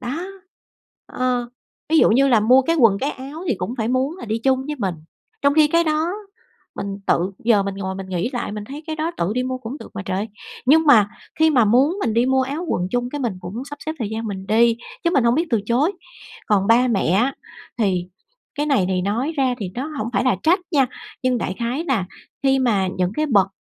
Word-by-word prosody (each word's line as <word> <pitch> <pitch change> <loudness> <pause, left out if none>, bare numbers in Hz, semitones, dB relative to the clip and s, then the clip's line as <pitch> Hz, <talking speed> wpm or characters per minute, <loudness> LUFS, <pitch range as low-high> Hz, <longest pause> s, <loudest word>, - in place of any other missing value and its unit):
Đó. 275 +9 -4 0.9
Ờ. 250 -1 -1 0.4
Ví 320 +1 +4
dụ - - +5
như 275 +5 +4
là 230 -4 +4
mua 255 +5 +5
cái 330 +5 +1
quần 225 -9 +4
cái 280 +6 -1
áo 285 +6 -8
thì 255 - +2
cũng 185 +7 -3
phải 220 - 0
muốn 260 +6 0
là - - -7
đi 220 0 -2
chung 265 +2 +1
với 300 0 -4
mình, 190 -5 -1 0.5
trong 280 0 +3
khi 305 -1 +5
cái 335 +2 +3
đó 310 +2 0 0.7
mình 195 0 -4
tự 180 +3 +1
giờ 220 -4 +4
mình 195 0 -4
ngồi 190 -1 -4
mình 190 0 -6
nghĩ 185 +6 -2
lại, 240 -4 -3
mình 210 0 -5
thấy 285 +7 -9
cái 315 -1 -4
đó 315 +2 -1
tự 170 +4 -1
đi 250 - 0
mua 255 0 -3
cũng 255 +4 -7
được - - -11
mà - - -4
trời. 195 +4 -2 0.4
Nhưng 315 +4 +5
mà 220 -8 +6 0.3
khi 320 - +6
mà 250 -6 +4
muốn 260 - +3
mình 225 - 0
đi 235 +2 +3
mua 265 0 +3
áo 285 +6 -3
quần 180 +1 -1
chung 245 0 -1
cái 290 - -4
mình 235 -7 -1
cũng 200 +9 -6
sắp 290 +1 -8
xếp 315 - -1
thời 225 -5 -2
gian 225 +1 -4
mình 195 -2 -5
đi, 230 +2 +4 0.3
chứ 340 - +3
mình 270 -8 +2
hông 235 +1 +4
biết 330 +3 +1
từ 230 -4 +2
chối. 270 - +2 0.5
Còn 200 -2 +2
ba 240 +3 +4
mẹ 215 -5 +1
á 240 +9 +2 0.4
thì 185 -5 +1 0.5
cái 295 +1 -1
này 270 -11 +2
thì 185 -1 0
nói 230 - -1
ra 260 -3 +2
thì 195 -5 -4
nó 255 +4 -3
hổng 220 - -2
phải 200 +5 +1
là 250 -6 +3
trách 355 +5 +3
nha, 280 -6 +3 0.4
nhưng 255 -1 +1
đại 185 - -3
khái 245 +8 -2
là 220 -9 +1 0.4
khi 270 -1 +3
mà 210 -7 +1
những 185 +1 0
cái 305 0 0
bậc 200 -8 +3
245 Hz, 240 wpm, -21 LUFS, 205-280 Hz, 0.9 s, mà